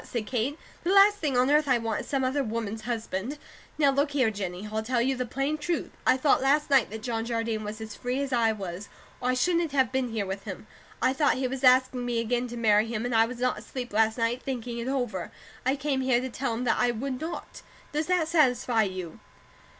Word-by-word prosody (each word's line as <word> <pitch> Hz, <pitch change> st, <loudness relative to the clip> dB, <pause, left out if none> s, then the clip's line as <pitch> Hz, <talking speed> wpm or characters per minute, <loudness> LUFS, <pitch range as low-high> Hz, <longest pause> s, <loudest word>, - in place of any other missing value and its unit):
said 235 Hz, -3 st, -4 dB
Kate. 250 Hz, +6 st, -1 dB, 0.3 s
"The 340 Hz, -, -1 dB
last 400 Hz, +1 st, +7 dB
thing 290 Hz, -8 st, -1 dB
on 255 Hz, +3 st, +3 dB
earth 300 Hz, 0 st, +4 dB
I 255 Hz, -2 st, +4 dB
want 225 Hz, -2 st, -2 dB
is -, -, -11 dB
some 270 Hz, -2 st, 0 dB
other 270 Hz, +2 st, +1 dB
woman's 220 Hz, -2 st, -3 dB
husband. 230 Hz, +3 st, -3 dB, 0.4 s
Now 285 Hz, -3 st, +4 dB
look 280 Hz, +2 st, +1 dB
here, 255 Hz, -6 st, +2 dB
Jennie, 195 Hz, -1 st, -5 dB
I'll 220 Hz, 0 st, -1 dB
tell 240 Hz, +2 st, 0 dB
you 260 Hz, +3 st, +1 dB
the 250 Hz, -1 st, -3 dB
plain 275 Hz, +5 st, -1 dB
truth. 340 Hz, +3 st, -2 dB, 0.2 s
I -, -, +5 dB
thought 270 Hz, 0 st, +3 dB
last 285 Hz, +2 st, +2 dB
night 270 Hz, -4 st, +5 dB
that 220 Hz, +1 st, -7 dB
John 230 Hz, -2 st, -2 dB
Jardine 230 Hz, -2 st, -2 dB
was 210 Hz, +1 st, -6 dB
as 220 Hz, -1 st, -7 dB
free 250 Hz, +2 st, -2 dB
as 280 Hz, -1 st, -2 dB
I 230 Hz, -2 st, +3 dB
was; 195 Hz, -2 st, -6 dB, 0.3 s
or 250 Hz, -, 0 dB
I -, -, +3 dB
shouldn't 335 Hz, +2 st, +1 dB
have 265 Hz, -4 st, +2 dB
been 260 Hz, -1 st, 0 dB
here 220 Hz, -3 st, -2 dB
with 195 Hz, +1 st, -5 dB
him. -, -, -7 dB, 0.4 s
I 260 Hz, -, +4 dB
thought 290 Hz, +1 st, +2 dB
he 260 Hz, 0 st, -1 dB
was 265 Hz, +1 st, -5 dB
asking 255 Hz, 0 st, +4 dB
me 240 Hz, -1 st, -1 dB
again 240 Hz, +2 st, 0 dB
to 240 Hz, 0 st, -7 dB
marry 215 Hz, -1 st, +3 dB
him, 225 Hz, 0 st, -3 dB
and 245 Hz, -, -2 dB
I 225 Hz, 0 st, +5 dB
was 250 Hz, +1 st, -7 dB
not 250 Hz, +1 st, 0 dB
asleep 250 Hz, -4 st, -7 dB
last 220 Hz, +1 st, +3 dB
night, 235 Hz, +2 st, 0 dB
thinking 240 Hz, -3 st, -4 dB
it 235 Hz, -, -4 dB
over. 245 Hz, -10 st, -2 dB, 0.4 s
I 265 Hz, -, +3 dB
came 275 Hz, -1 st, -1 dB
here 260 Hz, -2 st, +3 dB
to 260 Hz, 0 st, -4 dB
tell 245 Hz, -2 st, -2 dB
him 240 Hz, -, -3 dB
that 245 Hz, -, +1 dB
I 245 Hz, -, +3 dB
would 255 Hz, +3 st, -3 dB
not. 325 Hz, +2 st, -6 dB, 0.3 s
Does 305 Hz, +1 st, -1 dB
that 360 Hz, -3 st, +2 dB
satisfy 250 Hz, -7 st, +3 dB
you?" 185 Hz, -5 st, -4 dB
250 Hz, 240 wpm, -27 LUFS, 225-270 Hz, 0.4 s, last